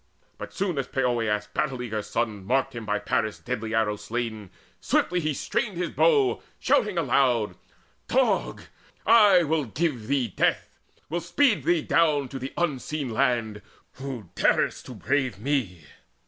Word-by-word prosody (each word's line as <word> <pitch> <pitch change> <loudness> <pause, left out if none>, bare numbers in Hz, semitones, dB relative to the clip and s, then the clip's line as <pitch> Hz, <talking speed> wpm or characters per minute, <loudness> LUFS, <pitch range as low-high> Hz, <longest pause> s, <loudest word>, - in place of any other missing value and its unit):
But - - -7
soon 185 -7 -2
as 130 - -2
Poeas' 120 -6 0
battle 135 -4 -1
eager 110 -3 -3
son 110 -2 -3
Marked 135 +5 0
him 115 -3 -7
by 105 0 +1
Paris' 110 -1 -1
deadly 115 -3 -4
arrow 105 -2 +1
slain, 110 -1 -4 0.3
Swiftly 180 0 +1
he 155 -2 -1
strained 190 - -2
his 175 -1 -2
bow, 425 -5 +3 0.2
shouting 210 -4 +1
aloud: 125 - +2 0.5
"Dog! - - +1 0.4
I 205 -5 +6
will 155 -1 0
give 125 -2 -2
thee 135 -2 +1
death, - - 0 0.4
will 170 +3 -2
speed 225 - +2
thee 170 -3 +2
down 150 -5 +2
To 135 - -6
the 130 +1 -5
Unseen 150 -3 -2
Land, 115 -4 0 0.4
who 130 -9 -7
darest - - +1
to - - -8
brave 130 -7 -1
me! 110 - -2
130 Hz, 150 wpm, -26 LUFS, 110-160 Hz, 0.5 s, I